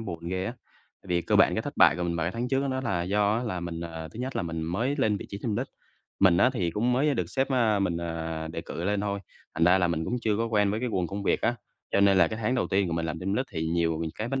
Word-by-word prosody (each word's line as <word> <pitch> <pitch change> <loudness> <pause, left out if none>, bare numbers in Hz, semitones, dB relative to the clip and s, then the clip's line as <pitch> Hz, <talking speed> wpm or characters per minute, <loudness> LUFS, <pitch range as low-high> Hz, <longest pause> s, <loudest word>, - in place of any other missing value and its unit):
buồn 85 -6 -6
ghê 95 +1 -2
á. 120 - -3 0.5
Tại - - -16
vì 85 -1 +1
cơ - - +2
bản - - +5
cái - - -1
thất - - -6
bại - - +6
của 90 - -3
mình 85 -1 -1
vào 80 - 0
cái 85 - -2
tháng 120 +2 -3
trước 135 +2 +1
đó 130 - -1
là 90 -7 0
do 105 +3 +2
á 120 - -1
là 95 -7 -3
mình, 85 -1 -5
à, 80 -1 -6
thứ 110 +10 -9
nhất 130 +1 -3
là - - 0
mình 80 -1 -3
mới 115 - -1
lên 110 -6 +2
vị - - -7
trí 100 - -5
team 110 -4 -1
lead. - - -2 0.5
Mình 95 -3 +6
á 125 +8 +5
thì 90 -7 0
cũng 115 +7 0
mới 140 +4 +2
được 90 -8 -1
sếp, 135 +7 0
a, 115 -5 +3
mình, 95 -4 0
à, 80 -1 -4
đề 80 - -3
cử 85 +1 -6
lên 100 +1 +1
thôi, 100 -1 -2 0.3
thành 80 - +2
ra 90 +2 +5
là 90 -2 +2
mình 80 -1 -1
cũng 120 - -1
chưa 105 -2 +1
có 115 - 0
quen 105 -3 +2
với 110 +2 -2
cái 125 - -1
guồng 90 -6 0
công 100 +3 -5
việc - - +1
á. 120 +2 +2 0.4
Cho - - +3
nên 100 -1 +5
là 85 - +5
cái 110 - -5
tháng 125 +4 +1
đầu 125 - +1
tiên 95 0 +2
của - - -3
mình 85 0 -1
làm 80 +1 -3
team 95 +2 -2
lead 130 +5 0
thì 80 -1 -2
nhiều 80 -1 0
cái 110 +2 -4
vấn 135 +1 -1
95 Hz, 320 wpm, -27 LUFS, 85-115 Hz, 0.5 s, bại